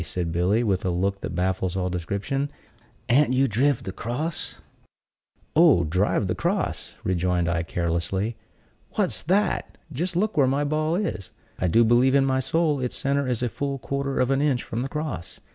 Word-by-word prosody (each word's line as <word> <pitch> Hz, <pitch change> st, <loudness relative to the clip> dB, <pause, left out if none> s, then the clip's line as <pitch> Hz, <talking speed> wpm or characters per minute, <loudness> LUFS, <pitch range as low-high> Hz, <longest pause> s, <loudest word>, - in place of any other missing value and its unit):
said 85 Hz, +1 st, -3 dB
Billy, 90 Hz, +7 st, +2 dB
with 95 Hz, -5 st, 0 dB
a 95 Hz, -, 0 dB
look 95 Hz, +3 st, -1 dB
that -, -, -5 dB
baffles 95 Hz, 0 st, 0 dB
all 90 Hz, -1 st, 0 dB
description, 100 Hz, -, -2 dB, 0.6 s
"an't 130 Hz, +1 st, +4 dB
you 135 Hz, +1 st, +3 dB
driv 130 Hz, +4 st, +1 dB
the 95 Hz, -, -4 dB
cross?" 125 Hz, -, -3 dB, 1.0 s
"Oh, 155 Hz, -, +6 dB
driv 95 Hz, +6 st, +1 dB
the 95 Hz, -, 0 dB
cross!" -, -, -2 dB
rejoined 90 Hz, -1 st, +1 dB
I, 85 Hz, -1 st, +1 dB
carelessly. 85 Hz, +6 st, -1 dB, 0.6 s
"What's -, -, +1 dB
that! 190 Hz, +4 st, 0 dB, 0.2 s
Just 175 Hz, +6 st, -2 dB
look 210 Hz, +5 st, +1 dB
where 140 Hz, -3 st, +4 dB
my 140 Hz, +3 st, +1 dB
ball 155 Hz, +2 st, 0 dB
is! 180 Hz, -, -3 dB, 0.3 s
I 90 Hz, -, +1 dB
do 115 Hz, +8 st, +5 dB
believe 120 Hz, +4 st, +4 dB
in 135 Hz, -1 st, +4 dB
my 130 Hz, -1 st, +1 dB
soul 150 Hz, +2 st, +1 dB
its 125 Hz, -1 st, -2 dB
center 140 Hz, 0 st, 0 dB
is 125 Hz, -1 st, -1 dB
a -, -, +2 dB
full 140 Hz, +3 st, -3 dB
quarter 140 Hz, +1 st, -2 dB
of 125 Hz, +1 st, +2 dB
an 135 Hz, +1 st, +2 dB
inch 140 Hz, -4 st, +1 dB
from 115 Hz, -, -4 dB
the 135 Hz, -, -3 dB
cross. 150 Hz, -, -5 dB
125 Hz, 180 wpm, -25 LUFS, 95-140 Hz, 1.0 s, Oh